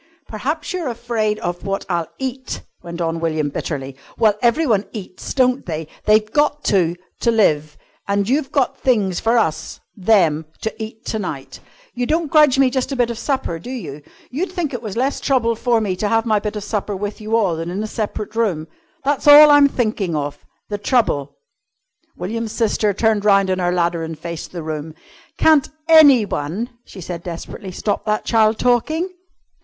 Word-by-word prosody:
"P'raps 290 Hz, -, -3 dB
you're 355 Hz, -5 st, -3 dB
afraid 230 Hz, -3 st, -1 dB
of 175 Hz, 0 st, -4 dB
what 195 Hz, 0 st, -3 dB
I'll 170 Hz, -3 st, -1 dB
eat," 260 Hz, 0 st, -5 dB, 0.2 s
went 170 Hz, 0 st, -7 dB
on 165 Hz, 0 st, -1 dB
William 155 Hz, -3 st, -1 dB
bitterly. 135 Hz, -2 st, -5 dB, 0.2 s
"Well, 215 Hz, -2 st, +4 dB
everyone 235 Hz, -4 st, +2 dB
eats, 190 Hz, -4 st, -7 dB
don't 255 Hz, 0 st, +2 dB
they? 160 Hz, -2 st, -4 dB, 0.2 s
They've 215 Hz, 0 st, +3 dB
got 295 Hz, 0 st, +1 dB
to 175 Hz, -3 st, +2 dB, 0.2 s
to 235 Hz, -, +1 dB
live. 155 Hz, -10 st, +2 dB, 0.3 s
And 200 Hz, 0 st, 0 dB
you've 270 Hz, +2 st, 0 dB
got 275 Hz, -4 st, 0 dB
things 205 Hz, -8 st, +1 dB
for 230 Hz, +2 st, +2 dB
us 160 Hz, -9 st, -1 dB, 0.2 s
them 175 Hz, -7 st, +2 dB
to 220 Hz, -, -2 dB
eat 220 Hz, +1 st, -8 dB
to 220 Hz, -, -2 dB
night. 145 Hz, -9 st, -6 dB, 0.3 s
You 245 Hz, -1 st, -2 dB
don't 320 Hz, -1 st, 0 dB
grudge 300 Hz, -4 st, +5 dB
me 270 Hz, -2 st, +4 dB
just 260 Hz, +1 st, -1 dB
a -, -, -1 dB
bit 245 Hz, -2 st, +1 dB
of 235 Hz, -, -6 dB
supper, 260 Hz, -, -2 dB
do 205 Hz, -, -10 dB
you? 155 Hz, -, -6 dB, 0.3 s
You'd 340 Hz, +10 st, -2 dB
think 345 Hz, -7 st, -3 dB
it 245 Hz, -, -4 dB
was 215 Hz, -2 st, -6 dB
less 265 Hz, +3 st, 0 dB
trouble 230 Hz, -4 st, +1 dB
for 235 Hz, 0 st, +1 dB
me 200 Hz, -4 st, -1 dB
to 210 Hz, -, -1 dB
have 225 Hz, +1 st, +1 dB
my 215 Hz, -2 st, +2 dB
bit 210 Hz, +1 st, -4 dB
of 210 Hz, -, -4 dB
supper 205 Hz, -1 st, -3 dB
with 205 Hz, +3 st, -5 dB
you 215 Hz, +1 st, -1 dB
all, 200 Hz, -7 st, +2 dB
than 165 Hz, +1 st, -4 dB
in 195 Hz, +4 st, -3 dB
a 215 Hz, -, -7 dB
separate 215 Hz, 0 st, -4 dB
room. 185 Hz, -9 st, 0 dB, 0.4 s
That's 285 Hz, +1 st, 0 dB
all 295 Hz, +1 st, +10 dB
I'm 290 Hz, -1 st, +7 dB
thinking 215 Hz, -, -1 dB
of 145 Hz, -1 st, -4 dB, 0.2 s
the 205 Hz, -1 st, -4 dB
trouble 145 Hz, -, 0 dB, 0.4 s
" -, -, -47 dB
William's 220 Hz, +4 st, -4 dB
sister 215 Hz, -2 st, +1 dB
turned 220 Hz, -1 st, +1 dB
round 195 Hz, -2 st, +4 dB
on 185 Hz, -, 0 dB
her 175 Hz, -1 st, +1 dB
ladder 170 Hz, -1 st, 0 dB
and 160 Hz, -1 st, -5 dB
faced 170 Hz, +1 st, -7 dB
the 170 Hz, -3 st, -6 dB
room. 155 Hz, 0 st, -5 dB, 0.4 s
"Can't 310 Hz, -3 st, +4 dB, 0.2 s
anyone," 240 Hz, -, +4 dB
she 190 Hz, -, -11 dB
said 170 Hz, 0 st, -6 dB
desperately, 180 Hz, +3 st, -7 dB
"stop 205 Hz, +2 st, -2 dB
that 215 Hz, -1 st, -1 dB
child 220 Hz, -1 st, +3 dB
talking?" 250 Hz, -, +1 dB
215 Hz, 190 wpm, -20 LUFS, 175-250 Hz, 0.4 s, all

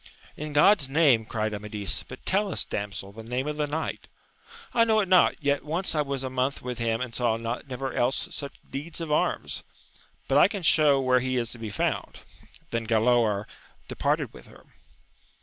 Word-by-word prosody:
In 150 Hz, 0 st, -6 dB
God's 150 Hz, 0 st, +5 dB
name! 135 Hz, -7 st, +4 dB
cried 110 Hz, -1 st, -2 dB
Amadis, 105 Hz, -1 st, -3 dB
but 130 Hz, -, -12 dB
tell 200 Hz, +1 st, +1 dB
us, -, -, -3 dB
damsel, 100 Hz, -1 st, -5 dB
the 110 Hz, +3 st, -10 dB
name 125 Hz, +4 st, -3 dB
of 150 Hz, 0 st, -3 dB
the 150 Hz, -1 st, 0 dB
knight. 155 Hz, +2 st, -4 dB, 0.3 s
— 465 Hz, 0 st, -19 dB
I 230 Hz, -, +5 dB
know 220 Hz, -1 st, +3 dB
it 200 Hz, -, +1 dB
not, 185 Hz, -1 st, +5 dB
yet 140 Hz, 0 st, +1 dB
once 165 Hz, +4 st, -2 dB
I 155 Hz, -, +2 dB
was 140 Hz, -2 st, -3 dB
a 130 Hz, -, -2 dB
month 130 Hz, +2 st, 0 dB
with 125 Hz, -1 st, -4 dB
him 115 Hz, 0 st, 0 dB
and 130 Hz, -2 st, -4 dB
saw 115 Hz, -2 st, +1 dB
never 125 Hz, +3 st, -4 dB
else 125 Hz, +2 st, 0 dB
such 140 Hz, -1 st, -6 dB
deeds 155 Hz, +4 st, -6 dB
of 165 Hz, -2 st, -4 dB
arms; 150 Hz, -, 0 dB, 0.7 s
but 135 Hz, +1 st, +4 dB
I -, -, +7 dB
can 200 Hz, -3 st, -5 dB
show 150 Hz, -3 st, +5 dB
where 130 Hz, -1 st, +3 dB
he 130 Hz, 0 st, -1 dB
is 120 Hz, -1 st, -1 dB
to 120 Hz, -, -8 dB
be 110 Hz, -1 st, -5 dB
found. 105 Hz, -, -2 dB, 0.5 s
Then 115 Hz, -1 st, -2 dB
Galaor 110 Hz, -2 st, +3 dB, 0.4 s
departed -, -, -1 dB
with -, -, -13 dB
her. -, -, -17 dB
130 Hz, 195 wpm, -27 LUFS, 115-150 Hz, 0.7 s, I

